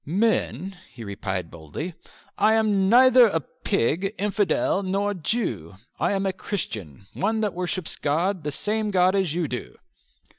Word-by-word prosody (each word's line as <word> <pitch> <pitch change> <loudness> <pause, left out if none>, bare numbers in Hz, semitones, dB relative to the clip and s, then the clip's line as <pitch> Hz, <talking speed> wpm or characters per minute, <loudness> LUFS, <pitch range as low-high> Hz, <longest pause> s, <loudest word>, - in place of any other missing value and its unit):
"Men," 190 - 0
he 115 - -10
replied 95 -4 -4
boldly, 85 - -6 0.4
"I 220 +1 +4
am 205 -3 +2
neither 245 -5 +6 0.2
pig, 185 - 0
infidel, 210 - +1
nor 200 +2 -1
Jew. 150 - -2 0.2
I - - +1
am 195 0 -1
a 190 - 0
Christian, 100 - -5
one 220 +3 0
that 210 -3 0
worships 180 -1 -2
God, 170 +5 0
the 150 - -2
same 210 +7 -1
God 185 -1 +3
as 185 -5 0
you 175 -3 0
do." 125 -2 -6
190 Hz, 145 wpm, -24 LUFS, 145-210 Hz, 0.4 s, neither